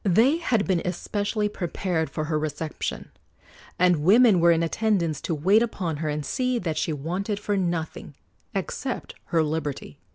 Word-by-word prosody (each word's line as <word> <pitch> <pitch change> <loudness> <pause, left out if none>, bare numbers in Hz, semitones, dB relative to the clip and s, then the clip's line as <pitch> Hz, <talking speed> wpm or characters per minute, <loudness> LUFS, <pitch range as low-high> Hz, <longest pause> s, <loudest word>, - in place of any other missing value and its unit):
They 225 - +4
had 230 -11 +1
been 185 -3 +1
especially 205 +4 -1
prepared 175 -4 -2
for 155 - -3
her 155 0 -1
reception, 155 +1 -4 0.7
and 180 -3 +3
women 210 +3 +6
were 170 +1 +5
in 165 0 +3
attendance 170 -5 0
to 165 - -2
wait 190 +9 +4
upon 185 -9 -2
her 155 0 -2
and 150 0 -3
see 255 - 0
that 170 -8 -2
she - - -1
wanted 180 +8 -3
for 205 0 -1
nothing, 170 -4 -3 0.4
except - - -3
her 165 -2 +2
liberty. 150 - -4
175 Hz, 160 wpm, -25 LUFS, 160-205 Hz, 0.7 s, women